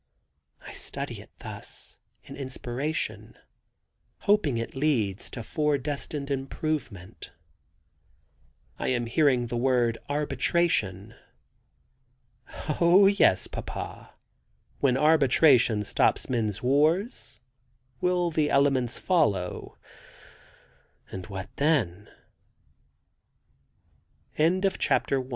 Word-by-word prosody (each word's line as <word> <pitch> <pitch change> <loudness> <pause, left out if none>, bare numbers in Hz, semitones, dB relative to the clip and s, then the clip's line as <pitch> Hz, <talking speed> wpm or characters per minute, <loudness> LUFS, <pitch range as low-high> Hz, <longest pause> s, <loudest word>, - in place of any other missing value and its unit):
I - - -9
study - - -6
it - - -16
thus, - - -9 0.3
in - - -10
inspiration, 135 +3 -4 0.8
hoping 200 - +2
it 115 - -4
leads 120 -9 0
to 115 - -7
fore 150 +4 0
destined 145 +1 -5
improvement. 135 - -4 1.5
I - - -2
am 120 -2 0
hearing 125 0 +2
the 120 0 -3
word 120 -2 +1
Arbitration. 135 - 0 1.7
"Oh, 175 +4 +6
yes, 195 - +4
papa; - - -7 0.6
when 130 -2 +2
arbitration 135 -6 +4
stops - - +1
men's 110 -4 -2
wars, 155 - +1 0.6
will 180 -1 +1
the 155 -2 +1
elements 135 -3 +2
follow, 105 - 0 1.3
and 95 -1 -7
what 95 -3 -6
then?" 115 - 0 2.3
[Illustration: 170 +5 +2
Deco 135 -8 +1
135 Hz, 85 wpm, -27 LUFS, 115-155 Hz, 2.3 s, Oh